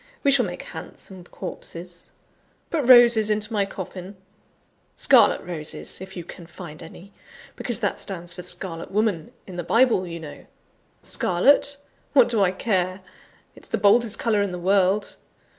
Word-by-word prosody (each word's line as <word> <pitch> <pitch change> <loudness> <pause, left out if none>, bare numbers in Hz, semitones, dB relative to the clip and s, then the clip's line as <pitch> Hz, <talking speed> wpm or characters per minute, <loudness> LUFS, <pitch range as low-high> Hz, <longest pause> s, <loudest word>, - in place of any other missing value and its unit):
We 280 - +4
shall 275 -3 +4
make - - -7
handsome 185 -3 -9
corpses. 175 -1 -8 0.6
Put 295 -7 -1
roses 240 -4 +7
into 210 +1 0
my 200 -2 +1
coffin 185 0 -8 0.8
scarlet - - +4
roses, 165 0 -7
if 190 0 -9
you 175 - -5
can 170 0 -12
find 170 -2 -10
any, 175 +4 -13 0.4
because 240 -1 0
that 205 - -1
stands 175 -3 -4
for 180 - -8
Scarlet 180 -1 -3
Woman 200 -6 -1
in 185 -2 -9
the 175 - -3
Bible, 225 -1 +3
you 170 0 -6
know. 155 -2 -11 0.6
Scarlet? 280 +10 +2 0.4
What 260 -4 +6
do 225 -3 +1
I 190 - +4
care! 185 -1 -1 0.5
It's - - -13
the - - -1
boldest 225 +2 +4
colour 215 -3 +1
in 200 - 0
the 180 - -5
world. 195 +2 +1
190 Hz, 155 wpm, -23 LUFS, 175-220 Hz, 0.8 s, roses